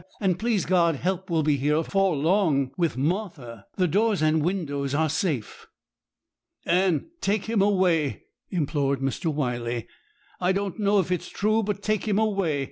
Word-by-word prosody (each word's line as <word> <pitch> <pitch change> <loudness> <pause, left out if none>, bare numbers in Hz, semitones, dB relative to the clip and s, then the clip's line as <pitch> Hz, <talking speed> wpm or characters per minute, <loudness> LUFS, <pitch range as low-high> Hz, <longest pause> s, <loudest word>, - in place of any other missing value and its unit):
And, 185 -4 0
please 220 -4 0
God, 170 -3 +3
help 190 +5 -2
will 165 -2 +1
be 150 -1 +2
here 145 +3 +1
afore 190 +2 +1
long 150 -4 +2
with 170 -6 0
Martha. 140 - -3
The 185 -2 +2
doors 205 0 +1
and 155 0 +3
windows 145 -6 -2
are 160 +1 +2
safe.' 155 - -2 1.0
'Anne, 180 - +1
take 200 0 0
him 220 -2 +1
away!' 185 -7 +2 0.3
implored 145 -5 0
Mr. 135 +5 -1
Wyley. 120 -5 -2 0.5
'I 180 +1 +2
don't 195 0 -3
know 205 0 +3
if 180 -1 -1
it 180 - +1
is - - -10
true, 215 +2 +1
but 205 -1 -3
take 215 0 -1
him 205 -2 +1
away. 195 -9 +1
175 Hz, 165 wpm, -25 LUFS, 145-195 Hz, 1.0 s, God